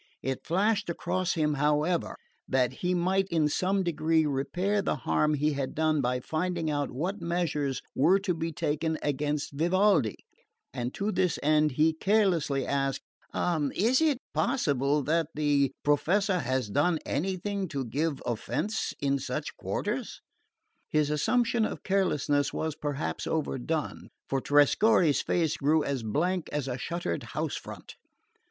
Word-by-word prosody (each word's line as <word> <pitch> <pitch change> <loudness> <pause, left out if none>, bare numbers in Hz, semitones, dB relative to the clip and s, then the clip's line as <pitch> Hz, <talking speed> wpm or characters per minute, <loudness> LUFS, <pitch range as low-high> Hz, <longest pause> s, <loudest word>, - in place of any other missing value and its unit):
It 130 0 -3
flashed 205 +3 +1
across 185 +2 -1
him, 150 -2 +1
however, 150 +4 +1 0.3
that 130 -2 +2
he 180 0 +1
might 185 +2 +1
in 160 -4 +2
some 190 +5 +1
degree 160 -1 +1
repair 180 +9 0
the - - 0
harm 150 +2 +1
he 150 +1 +1
had 140 -2 -3
done 155 -1 +2
by 125 0 0
finding 165 +2 -2
out 145 -1 -1
what 180 +9 -3
measures 165 -6 -1
were 175 +8 +4
to 190 -2 0
be 165 0 -3
taken 160 0 -1
against 145 +1 -1
Vivaldi; 170 - +2 0.6
and 125 -1 -3
to 205 +2 -1
this 185 -2 +1
end 150 -1 +3
he 155 +4 +3
carelessly 170 - +1
asked: 135 -1 -1 0.3
"Is 175 - +1
it 305 -5 +3 0.2
possible 145 - +1
that 160 +2 +1
the 145 -3 +2
Professor 185 +6 +2
has 130 -5 -1
done 175 - +2
anything 190 +4 -2
to 140 -4 -3
give 145 +4 -2
offence 125 - -2
in 140 0 +1
such - - -4
quarters?" - - -3 0.7
His 150 -1 +1
assumption 230 - +2
of - - -3
carelessness 150 -7 +1
was 160 -1 -2
perhaps 145 -1 -3
overdone; 155 0 -2 0.2
for 135 -1 -1
Trescorre's 145 - +4
face 165 -3 0
grew 150 +2 +2
as 140 -3 -2
blank 165 - -1
as 145 -2 -2
a 125 0 -3
shuttered 170 - -3 0.2
house - - -1
front. - - -9
155 Hz, 145 wpm, -28 LUFS, 140-180 Hz, 0.7 s, were